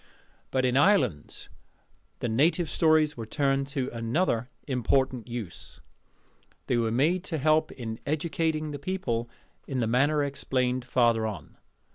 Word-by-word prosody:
But 130 -1 +1
in 125 +1 +2
Ireland 140 - +2 0.7
the - - 0
native 155 +8 +2
stories 155 -2 +3
were 115 -2 -7
turned 135 +1 0
to 135 -2 -2
another 120 +1 0 0.2
important 130 -1 0
use: 115 -8 -7 0.9
they - - 0
were 115 -1 +1
made 155 +10 +1
to 165 - -2
help 155 +2 +2
in 110 -3 -6
educating 155 0 -1
the 145 - -6
people 135 -9 -2 0.4
in 135 -2 -2
the 120 - +1
manner 140 +6 +2
explained 130 -3 -1
farther 120 -3 +2
on. 95 -8 -8
130 Hz, 135 wpm, -27 LUFS, 120-155 Hz, 0.9 s, stories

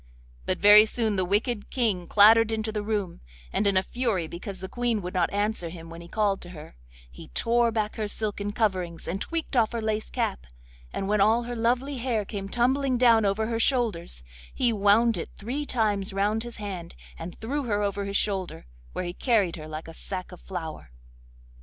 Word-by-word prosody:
But - - +1
very 210 +2 +8
soon 220 -2 0
the 190 - +1
wicked 205 +4 0
King 210 -9 0
clattered 220 +2 +6
into 220 0 -1
the 210 -1 -2
room, 205 -4 -3 0.3
and 205 - +1
in 195 -1 +3
a 185 - +3
fury 225 -7 -1
because 185 +4 -7
the 190 - -5
Queen 240 +1 0
would 180 - -5
not 180 -2 +1
answer 205 -4 -1
when 165 0 -9
he 170 - -11
called 200 +1 0
to 175 - -9
her, 150 - -11 0.4
he - - -11
tore 235 0 +2
back 215 -1 -2
her 215 -1 -1
silken 205 -1 -3
coverings 185 -6 -1
and 190 +3 -3
tweaked 330 -4 -3
off 230 -2 +3
her 235 - -1
lace 220 -1 -2
cap, 65 0 -2 0.4
and 195 - -3
when 210 0 +2
all 225 +4 +4
her 240 +1 -5
lovely 245 +4 0
hair 230 -4 -1
came 195 -1 -5
tumbling 255 +3 +1
down 230 -3 +5
over 200 +2 +1
her 225 0 -2
shoulders, 220 - 0 0.3
he 240 -2 +1
wound 215 +3 +4
it - - -5
three 270 +8 -4
times 205 -5 0
round 205 +3 +1
his 240 0 -5
hand 190 -5 -6 0.2
and 170 +2 -8
threw 275 +5 -2
her 205 -3 0
over 200 0 -1
his 200 0 0
shoulder, 190 - -2 0.3
where 185 - -3
he 175 - -4
carried 205 -7 +1
her 155 -1 -8
like 155 +1 -7
a 165 - -9
sack 185 +2 -6
of 180 - -12
flour. 165 - -6
210 Hz, 200 wpm, -26 LUFS, 185-230 Hz, 0.4 s, very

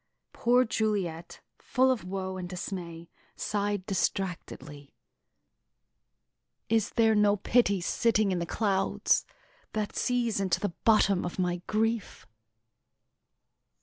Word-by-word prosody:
Poor 245 +2 +3
Juliet, 195 -7 -2 0.2
full 260 +1 +2
of 250 -7 -2
woe 190 0 -4
and 180 -1 -6
dismay, 175 -2 -6 0.3
sighed 205 -2 -2
distractedly: 175 -7 -3 1.7
"Is 220 -2 +2
there 225 -1 +4
no 210 -1 +3
pity 205 -2 +2
sitting 215 +2 +1
in 180 - 0
the 170 - -3
clouds 195 -2 +1 0.5
That 215 -1 -3
sees 240 -4 0
into 190 -3 +1
the 205 -4 -2
bottom 200 -4 +4
of 175 - -5
my 180 -1 -1
grief?" 225 0 -1
200 Hz, 110 wpm, -28 LUFS, 180-220 Hz, 1.7 s, there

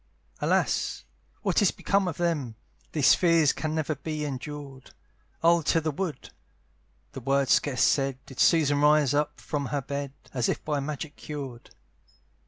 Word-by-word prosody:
"Alas! - - 0 0.4
what - - +2
is 200 - +5
become 200 -1 0
of 160 - -3
them? 150 -10 -1 0.4
"These 145 -5 +5
fears 165 -4 +4
can 155 0 -3
never 155 -1 -1
be 150 +2 -4
endured, 140 -1 -7 0.5
"I'll 170 0 +5
to 165 +2 +2
the 155 -1 -2
wood." 165 +1 -5 0.8
The - - -7
word 135 +1 +1
scarce 135 -3 +3
said, 135 -2 +2
Did 135 - -12
Susan 145 +1 +4
rise 150 -2 +4
up 150 +1 0
from 145 -2 -3
her 145 +1 -2
bed, 140 0 -4 0.2
As 125 -3 0
if - - -3
by 150 -2 0
magic 150 +1 -5
cured. 135 -6 -7
145 Hz, 155 wpm, -27 LUFS, 135-155 Hz, 0.8 s, is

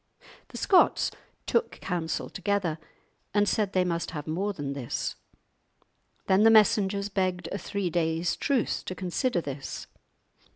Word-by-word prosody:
The - - -9
Scots 375 - +4 0.3
took 470 - +1
counsel 175 -3 -2
together 195 -4 -1 0.6
and 205 0 +4
said 205 -3 +1
they 185 - +3
must 170 -1 -1
have 150 -4 -5
more 185 +6 -1
than 145 -7 -4
this. 135 -4 -3 1.1
Then 190 +1 +4
the 225 - +7
messengers 205 -2 +4
begged 185 -3 -1
a 200 - -3
three 195 -4 -2
days' 165 0 0
truce 270 -6 0
to 185 - -4
consider 185 +2 0
this. 140 -2 -6
185 Hz, 135 wpm, -28 LUFS, 165-205 Hz, 1.1 s, the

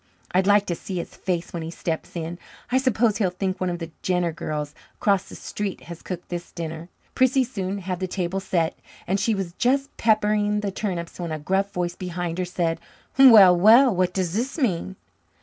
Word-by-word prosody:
I'd 185 +1 +2
like 205 0 +5
to 175 - -2
see 185 +3 -6
his 170 - -5
face 175 -3 -3
when 170 - -3
he 160 - -5
steps 165 0 -4
in. 170 +1 -5 0.3
I 260 - +4
suppose 235 -4 +2
he'll 195 -5 +2
think 185 +1 -3
one 185 - +1
of 175 - -2
the 165 -1 -7
Jenner 180 -2 0
girls 150 -2 -4 0.2
across 200 -2 +1
the - - -10
street 205 -2 -5
has 170 -1 -10
cooked 180 -1 -7
his 175 0 -5
dinner." 165 0 -6 0.2
Prissy 260 0 +3
soon 200 -5 -4
had 185 -2 -4
the 185 - -2
table 185 0 -2
set, 170 -4 -1 0.3
and 195 +2 0
she 215 +2 +1
was 190 -3 -4
just 275 +3 +1
peppering 210 -1 +2
the 200 -1 -2
turnips 180 -4 -4
when 170 -2 -4
a 155 - -2
gruff 190 +6 -1
voice 175 -1 -2
behind 175 -1 -4
her 185 - 0
said: 170 -2 -1 0.4
"Well, 215 -9 +9
well, 225 +6 +6
what 180 0 +1
does 180 -2 -2
this 245 - -2
mean?" 190 - -1
185 Hz, 200 wpm, -24 LUFS, 175-210 Hz, 0.4 s, Well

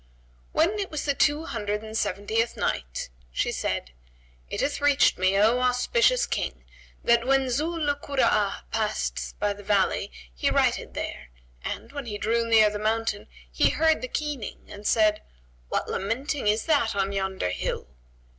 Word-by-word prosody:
When 385 +6 +2
it 395 - -2
was 305 -2 -4
the 285 - +2
Two 295 +3 +2
Hundred 210 -4 -3
and 220 0 -8
Seventieth 215 +3 0
Night, 60 -1 -2 0.2
She - - 0
said, 60 - -2 0.6
It - - -4
hath 285 0 -1
reached 285 -7 +4
me, 185 +1 +3
O 220 +5 +4
auspicious 480 - +3
King, - - -3 0.4
that 235 +1 +3
when 270 -1 +3
Zu 310 +7 0
'l 295 -3 +1
Kura'a 260 -8 +1
passed 215 -1 -2
by 205 0 +1
the 205 - -12
valley 200 -1 +1 0.2
he - - 0
righted - - +1
there, 65 - -5 0.3
and, - - -5
when 280 -3 -6
he 210 -2 -4
drew 230 +2 0
near 220 -2 +6
the 210 - -4
mountain, 220 -1 -1 0.2
he - - +3
heard 320 0 +2
the 255 - -3
keening 290 -4 -4
and 205 0 -6
said, 215 -1 +3 0.5
"What - - -1
lamenting 245 +6 -2
is 210 +2 +2
that 285 -10 +2
on 195 0 0
yonder 190 - -1
hill?" 90 - -3
225 Hz, 165 wpm, -26 LUFS, 205-285 Hz, 0.6 s, near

